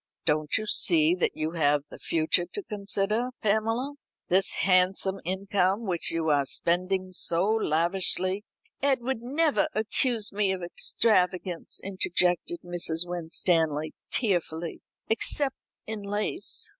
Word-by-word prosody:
"Don't 155 Hz, -1 st, +1 dB
you 215 Hz, -, -3 dB
see 320 Hz, +8 st, +3 dB
that 435 Hz, +3 st, -1 dB
you 155 Hz, +1 st, -2 dB
have 145 Hz, -3 st, +2 dB
the -, -, -10 dB
future 165 Hz, +2 st, 0 dB
to 410 Hz, -, -4 dB
consider, 210 Hz, -, -1 dB
Pamela. 225 Hz, +6 st, 0 dB, 0.4 s
This 190 Hz, +2 st, +3 dB
handsome 190 Hz, +1 st, +2 dB
income 190 Hz, +3 st, 0 dB
which 175 Hz, -4 st, -1 dB
you 165 Hz, -1 st, -1 dB
are 140 Hz, -2 st, +2 dB
spending 185 Hz, +4 st, 0 dB
so 175 Hz, 0 st, +1 dB
lavishly 185 Hz, 0 st, +1 dB, 0.2 s
" -, -, -39 dB
"Edward 265 Hz, -3 st, 0 dB
never 300 Hz, +4 st, +1 dB
accused 220 Hz, 0 st, 0 dB
me 200 Hz, -1 st, +2 dB
of 185 Hz, -2 st, -5 dB
extravagance," 180 Hz, -1 st, 0 dB
interjected 185 Hz, -, 0 dB
Mrs. 175 Hz, -1 st, +2 dB
Winstanley 160 Hz, -3 st, +1 dB, 0.2 s
tearfully, 175 Hz, -6 st, -1 dB, 0.3 s
"except 270 Hz, +4 st, +2 dB, 0.3 s
in 220 Hz, -1 st, -5 dB
lace. 210 Hz, -, -2 dB
190 Hz, 120 wpm, -27 LUFS, 175-220 Hz, 0.4 s, see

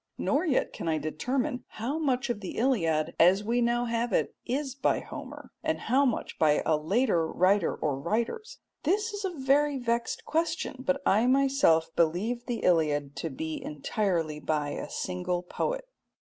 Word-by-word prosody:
Nor 310 Hz, +6 st, +1 dB
yet 270 Hz, -, +1 dB
can -, -, -5 dB
I 160 Hz, -1 st, +2 dB
determine 245 Hz, -, -2 dB
how 255 Hz, +8 st, -2 dB
much 265 Hz, -4 st, 0 dB
of 235 Hz, -, -4 dB
the 190 Hz, -, -7 dB
Iliad 165 Hz, -, +1 dB
as 185 Hz, +4 st, +5 dB
we 235 Hz, +3 st, +1 dB
now 240 Hz, +1 st, +1 dB
have 235 Hz, 0 st, -1 dB
it -, -, +1 dB
is 270 Hz, +2 st, -1 dB
by 270 Hz, 0 st, +1 dB
Homer, -, -, -9 dB
and -, -, 0 dB
how 265 Hz, +5 st, +3 dB
much 245 Hz, -, -2 dB
by 150 Hz, -2 st, +3 dB
a 155 Hz, -, +3 dB
later 170 Hz, +2 st, +1 dB
writer 185 Hz, +2 st, +2 dB
or 140 Hz, -3 st, -2 dB
writers. 235 Hz, -, -2 dB, 0.2 s
This 415 Hz, +7 st, 0 dB
is 410 Hz, 0 st, -4 dB
a 385 Hz, -, 0 dB
very 280 Hz, +2 st, +2 dB
vexed 235 Hz, -2 st, -2 dB
question, 325 Hz, -3 st, -1 dB
but 275 Hz, +1 st, -1 dB
I 220 Hz, +5 st, +4 dB
myself 265 Hz, -, +3 dB
believe 205 Hz, +9 st, 0 dB
the 240 Hz, -2 st, -3 dB
Iliad 150 Hz, -4 st, +2 dB
to 165 Hz, -, -3 dB
be 160 Hz, +3 st, -5 dB
entirely 160 Hz, 0 st, -1 dB
by 150 Hz, -1 st, -1 dB
a -, -, -5 dB
single 180 Hz, -1 st, -2 dB
poet. -, -, -3 dB
230 Hz, 170 wpm, -28 LUFS, 165-270 Hz, 0.2 s, as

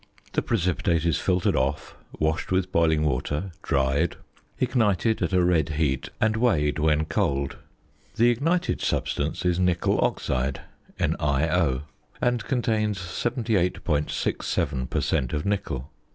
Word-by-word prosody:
The -, -, +2 dB
precipitate 90 Hz, -5 st, 0 dB
is 80 Hz, -2 st, +2 dB
filtered 90 Hz, -2 st, +1 dB
off, -, -, -1 dB, 0.2 s
washed 80 Hz, +3 st, -1 dB
with 95 Hz, 0 st, +1 dB
boiling 80 Hz, -3 st, +3 dB
water, 75 Hz, +6 st, -1 dB
dried, 70 Hz, +4 st, +1 dB, 0.4 s
ignited 110 Hz, -4 st, +1 dB
at -, -, 0 dB
a 90 Hz, -1 st, +3 dB
red 85 Hz, -3 st, +2 dB
heat, 70 Hz, -5 st, 0 dB
and 110 Hz, -2 st, +2 dB
weighed 85 Hz, -11 st, +2 dB
when 80 Hz, 0 st, +2 dB
cold. 70 Hz, -4 st, -1 dB, 0.6 s
The 120 Hz, +2 st, +5 dB
ignited 165 Hz, +9 st, 0 dB
substance 75 Hz, +5 st, -1 dB
is 90 Hz, 0 st, +2 dB
nickel 90 Hz, -2 st, +2 dB
oxide 65 Hz, +1 st, -1 dB, 0.4 s
(NiO), 75 Hz, -1 st, +1 dB, 0.4 s
and 125 Hz, -1 st, +1 dB
contains 110 Hz, -5 st, 0 dB
78.67 90 Hz, -, -1 dB
per -, -, 0 dB
cent. 65 Hz, -2 st, 0 dB
of 75 Hz, -, -2 dB
nickel. 75 Hz, -10 st, -2 dB
85 Hz, 125 wpm, -25 LUFS, 75-105 Hz, 0.6 s, The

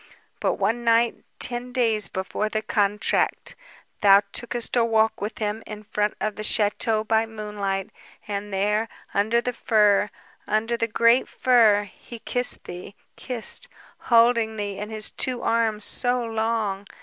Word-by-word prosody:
But -, -, +1 dB
one 240 Hz, +1 st, -1 dB
night, 230 Hz, 0 st, +2 dB
ten 245 Hz, +1 st, -2 dB
days 225 Hz, -4 st, +3 dB
before 190 Hz, +3 st, -3 dB
the 215 Hz, 0 st, -2 dB
contract, 205 Hz, -1 st, 0 dB, 0.5 s
thou 200 Hz, -1 st, +7 dB
tookest 240 Hz, 0 st, -3 dB
a 240 Hz, -, +4 dB
walk 220 Hz, -2 st, +1 dB
with 210 Hz, +1 st, -4 dB
him 215 Hz, 0 st, -2 dB
in 215 Hz, 0 st, -8 dB
front 210 Hz, 0 st, -1 dB
of 215 Hz, -1 st, -2 dB
the 215 Hz, -, -4 dB
chateau 215 Hz, +1 st, +1 dB
by 220 Hz, +1 st, +1 dB
moonlight... 210 Hz, -2 st, -4 dB, 0.4 s
and 205 Hz, 0 st, -4 dB
there... 210 Hz, +3 st, 0 dB, 0.2 s
under 220 Hz, +4 st, +2 dB
the 250 Hz, +1 st, -3 dB
fir, 210 Hz, -3 st, +3 dB, 0.4 s
under 225 Hz, +2 st, 0 dB
the 230 Hz, 0 st, -1 dB
great 230 Hz, +3 st, +3 dB
fir... 225 Hz, -5 st, +4 dB
he 220 Hz, +4 st, -12 dB
kissed 245 Hz, +2 st, -1 dB
thee... 180 Hz, +3 st, -9 dB, 0.2 s
kissed... 250 Hz, -, -3 dB, 0.3 s
holding 230 Hz, -2 st, +3 dB
thee 205 Hz, -2 st, -4 dB
in 210 Hz, +1 st, -5 dB
his 215 Hz, -1 st, -2 dB
two 250 Hz, -2 st, -1 dB
arms... 225 Hz, -2 st, +1 dB
so 245 Hz, -1 st, +1 dB
long. 220 Hz, -3 st, -2 dB
220 Hz, 150 wpm, -24 LUFS, 210-230 Hz, 0.5 s, thou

